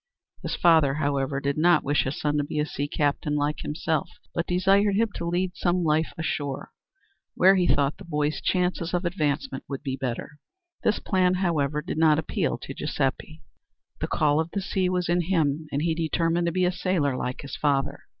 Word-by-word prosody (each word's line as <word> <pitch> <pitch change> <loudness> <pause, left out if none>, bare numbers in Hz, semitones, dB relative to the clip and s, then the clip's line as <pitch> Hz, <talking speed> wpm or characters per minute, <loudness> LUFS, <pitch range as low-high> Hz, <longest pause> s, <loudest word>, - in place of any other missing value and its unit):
His - - -3
father, 160 -6 +4
however, 140 -2 0
did 140 +1 -1
not 170 -1 +4
wish 145 +1 +1
his 135 +2 -3
son 150 0 0
to - - +1
be 145 - -5
a 150 - +2
sea 145 -2 -3
captain 145 0 0
like 145 +1 0
himself, 160 +3 -2 0.2
but 170 - -2
desired 195 +3 +3
him 225 +2 +2
to 170 - -4
lead 180 +2 0
some 180 0 +1
life 155 0 +1
ashore, 145 -4 -3 0.6
where, 190 +2 +6
he 180 -2 +2
thought, 140 0 +2
the - - -11
boy's 150 -2 -1
chances 180 -1 0
of 175 +1 -1
advancement 170 - -1
would 135 -2 -6
be 135 -2 -2
better. 135 +3 -5 0.4
This 215 - +2
plan, 185 -1 +1
however, 150 -5 0
did - - -4
not 155 -2 +5
appeal 160 - -1
to - - -6
Giuseppe. - - -3 0.6
The - - -2
call 150 0 +2
of 160 +1 -1
the 200 - -1
sea 190 -1 0
was 180 -1 0
in 175 +1 +2
him 160 -4 0
and 145 +2 -1
he 165 -1 +1
determined 165 +1 0
to - - +1
be 185 +1 +1
a 180 - +2
sailor 180 -7 0
like 125 0 -3
his 140 - -7
father. 140 -2 0
160 Hz, 200 wpm, -26 LUFS, 145-180 Hz, 0.6 s, where